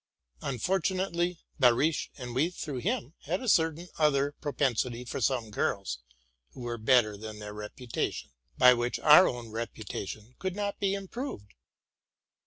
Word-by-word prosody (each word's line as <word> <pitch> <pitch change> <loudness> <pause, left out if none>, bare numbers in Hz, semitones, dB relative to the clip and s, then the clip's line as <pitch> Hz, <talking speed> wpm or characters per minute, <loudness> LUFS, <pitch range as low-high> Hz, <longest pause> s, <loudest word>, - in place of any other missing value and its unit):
Unfortunately 180 - 0 0.2
Behrisch, 130 +5 +3
and 125 -3 -6
we 145 +7 +2
through 150 -7 -5
him, 125 +3 -2
had 180 +6 -1
a 255 - -6
certain 165 -3 +2
other 145 -2 +3
propensity 125 -4 0
for - - -4
some 120 -5 0
girls 100 -10 -1 0.5
who - - -10
were 120 -1 -4
better 110 -2 +4
than 110 +1 -8
their 105 0 -7
reputation, 105 - -4
— 70 - -39
by 125 -1 +8
which 120 0 -1
our 155 +5 +8
own 120 -3 -4
reputation 110 0 -6
could 190 -1 -2
not 205 -1 -2
be 195 -1 +1
im 195 -1 -6
proved. 235 - -6
125 Hz, 150 wpm, -29 LUFS, 115-170 Hz, 0.5 s, by